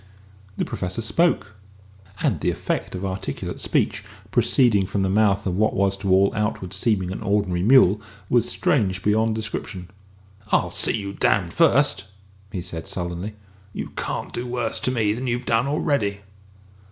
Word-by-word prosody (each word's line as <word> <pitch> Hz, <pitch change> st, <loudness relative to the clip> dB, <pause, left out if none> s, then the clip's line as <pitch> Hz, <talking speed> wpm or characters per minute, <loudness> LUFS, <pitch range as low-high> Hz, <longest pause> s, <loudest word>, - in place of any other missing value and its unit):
The -, -, 0 dB
Professor 95 Hz, +4 st, -3 dB
spoke; 135 Hz, -4 st, +1 dB, 0.7 s
and -, -, +1 dB
the -, -, +1 dB
effect -, -, -2 dB
of 95 Hz, +1 st, -4 dB
articulate 95 Hz, -6 st, -4 dB
speech -, -, 0 dB, 0.3 s
proceeding 105 Hz, -7 st, +3 dB
from 100 Hz, 0 st, -1 dB
the 95 Hz, -, +1 dB
mouth 100 Hz, -1 st, +2 dB
of 90 Hz, -2 st, -1 dB
what 110 Hz, +1 st, +2 dB
was 100 Hz, 0 st, +2 dB
to 100 Hz, 0 st, -3 dB
all 95 Hz, +1 st, +4 dB
outward 105 Hz, -4 st, -2 dB
seeming 95 Hz, -2 st, 0 dB
an 95 Hz, -, -5 dB
ordinary 100 Hz, -4 st, 0 dB
mule 105 Hz, -2 st, +5 dB, 0.3 s
was 120 Hz, -1 st, +2 dB
strange 95 Hz, -9 st, +1 dB
beyond 110 Hz, +1 st, +2 dB
description. 105 Hz, -4 st, -5 dB, 0.6 s
"I'll -, -, +2 dB
see -, -, 0 dB
you 100 Hz, -2 st, -5 dB
damned 95 Hz, -3 st, +1 dB
first," 140 Hz, -, +3 dB, 0.5 s
he 90 Hz, -, -4 dB
said 85 Hz, -1 st, -6 dB
sullenly. 90 Hz, +2 st, -4 dB, 0.4 s
"You -, -, -5 dB
can't -, -, -4 dB
do 120 Hz, +1 st, -4 dB
worse 120 Hz, -2 st, -1 dB
to -, -, 0 dB
me 110 Hz, -4 st, +1 dB
than 125 Hz, +4 st, -4 dB
you've 120 Hz, +1 st, -1 dB
done 115 Hz, +3 st, +2 dB
already!" 115 Hz, -9 st, 0 dB
100 Hz, 160 wpm, -23 LUFS, 95-115 Hz, 0.7 s, mule